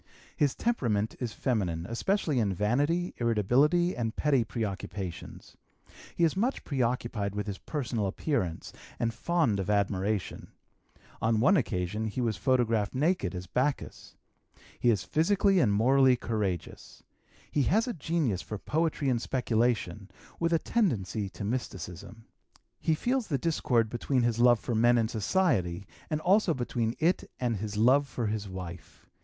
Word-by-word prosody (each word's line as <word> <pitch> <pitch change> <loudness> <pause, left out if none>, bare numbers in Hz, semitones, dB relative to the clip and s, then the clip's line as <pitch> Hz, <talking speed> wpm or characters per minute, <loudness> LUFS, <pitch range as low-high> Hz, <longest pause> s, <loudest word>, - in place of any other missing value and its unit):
His 145 -3 +1
temperament 115 - 0
is 120 -3 -3
feminine, 95 -10 -1
especially 150 - 0
in 100 -4 0
vanity, 145 - +1
irritability, 125 - +2
and 115 -2 -2
petty 140 -5 +2
preoccupations. 100 -5 -6 0.6
He 170 - +1
is 165 0 +3
much 235 +8 0
preoccupied 120 -6 -1
with 105 - -2
his 100 -2 -5
personal 120 -8 -2
appearance 95 - -2 0.2
and 115 -1 -1
fond 160 - +1
of 95 +1 -3
admiration; 100 0 -1 0.7
on 110 -1 +2
one 185 - +5
occasion 105 - -1
he 110 - -4
was 115 -3 0
photographed 115 -3 +1
naked 140 - +1
as 90 0 -5
Bacchus. 130 +9 -2 0.6
He 120 - +3
is 105 -6 +2
physically 195 +4 +2
and 120 -10 +3
morally 130 +5 +4
courageous. 105 -7 -4 0.5
He 145 - +1
has 220 +7 +2
a 245 - -2
genius 150 - -1
for 105 - -6
poetry 155 +4 -1
and 120 -3 +1
speculation, 115 -6 0 0.3
with 170 0 +1
a 165 - +4
tendency 110 - -1
to 100 - -8
mysticism. 100 -2 -5 0.5
He 160 - +1
feels 250 +7 -1
the 140 - 0
discord 130 -6 +1
between 120 +3 0
his 120 -1 0
love 120 -1 +5
for 120 - -3
men 120 +2 +4
and 115 -1 +1
society, 105 - 0 0.4
also 190 -3 +3
between 120 -2 -2
it 170 +4 +1
and 120 -3 0
his 105 +1 -5
love 130 +6 +4
for 120 -2 -3
his 105 -1 -3
wife. 90 -3 -9
120 Hz, 145 wpm, -29 LUFS, 105-145 Hz, 0.7 s, one